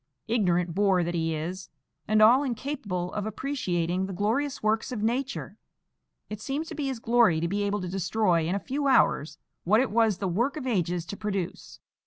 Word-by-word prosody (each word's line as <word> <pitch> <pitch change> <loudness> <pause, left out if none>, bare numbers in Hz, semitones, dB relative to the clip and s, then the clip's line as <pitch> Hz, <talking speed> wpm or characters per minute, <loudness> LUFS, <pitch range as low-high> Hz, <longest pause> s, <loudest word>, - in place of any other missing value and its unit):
Ignorant 180 -7 +1
boor 190 -1 +3
that 170 +1 -2
he 165 -1 -1
is, 180 +4 -5 0.4
and 215 +1 +4
all 245 +5 +7
incapable 235 -9 -3
of 210 0 -3
appreciating 190 -8 -2
the 195 - -6
glorious 225 +10 -1
works 220 +4 +1
of 220 -4 -3
Nature, 260 +5 -2 0.7
it 210 0 -7
seems 285 +7 -3
to - - -6
be 290 -3 -2
his 265 -2 -2
glory 225 -7 +3
to 170 - -1
be 200 +4 -1
able 205 0 -1
to 180 - -4
destroy 180 -2 +1
in 180 - 0
a - - 0
few 280 +6 -2
hours 150 - +3 0.3
what 210 +5 +4
it 260 - +1
was 220 -3 +3
the 195 - -2
work 235 - 0
of 280 - -5
ages 180 -7 0
to 200 - -6
produce. 200 -4 -4
205 Hz, 195 wpm, -27 LUFS, 180-240 Hz, 0.7 s, all